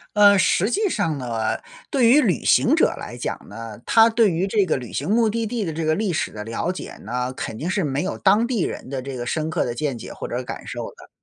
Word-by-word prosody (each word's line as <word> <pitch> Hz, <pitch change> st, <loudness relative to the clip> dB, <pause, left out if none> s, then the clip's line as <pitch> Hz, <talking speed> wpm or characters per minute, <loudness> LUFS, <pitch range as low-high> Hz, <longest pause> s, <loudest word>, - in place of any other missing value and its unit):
呃， 205 Hz, -1 st, +7 dB
实 190 Hz, +3 st, +3 dB
际 420 Hz, +1 st, +1 dB
上 165 Hz, -, -1 dB
呢， 115 Hz, -4 st, -2 dB, 0.3 s
对 260 Hz, -5 st, +4 dB
于 285 Hz, +5 st, +6 dB
旅 185 Hz, -, 0 dB
行 -, -, +4 dB
者 -, -, +5 dB
来 -, -, -7 dB
讲 -, -, -3 dB
呢， 110 Hz, 0 st, -8 dB
他 225 Hz, 0 st, +6 dB
对 225 Hz, -3 st, +3 dB
于 175 Hz, +4 st, 0 dB
这 200 Hz, 0 st, +2 dB
个 160 Hz, -, 0 dB
旅 125 Hz, -3 st, -8 dB
行 145 Hz, -, -2 dB
目 225 Hz, +1 st, +3 dB
的 225 Hz, +1 st, -1 dB
地 225 Hz, -1 st, -2 dB
的 165 Hz, -, -3 dB
这 160 Hz, +1 st, -3 dB
个 155 Hz, 0 st, +2 dB
历 195 Hz, +1 st, -1 dB
史 -, -, -1 dB
的 105 Hz, -, -7 dB
了 115 Hz, +10 st, -2 dB
解 185 Hz, -, -7 dB
呢， 125 Hz, +4 st, -3 dB
肯 110 Hz, -, -5 dB
定 160 Hz, +9 st, -3 dB
是 190 Hz, 0 st, 0 dB
没 140 Hz, -1 st, -1 dB
有 190 Hz, -, -3 dB
当 210 Hz, +4 st, +3 dB
地 240 Hz, -5 st, -1 dB
人 -, -, -5 dB
的 135 Hz, -1 st, -3 dB
这 130 Hz, 0 st, -6 dB
个 120 Hz, -, -4 dB
深 155 Hz, +5 st, -1 dB
刻 155 Hz, -, 0 dB
的 120 Hz, -, -3 dB
见 140 Hz, -1 st, -2 dB
解 -, -, -8 dB
或 -, -, -7 dB
者 120 Hz, -, -2 dB
感 -, -, -7 dB
受 -, -, -5 dB
的， -, -, -16 dB
165 Hz, 285 characters per minute, -22 LUFS, 130-215 Hz, 0.3 s, 呃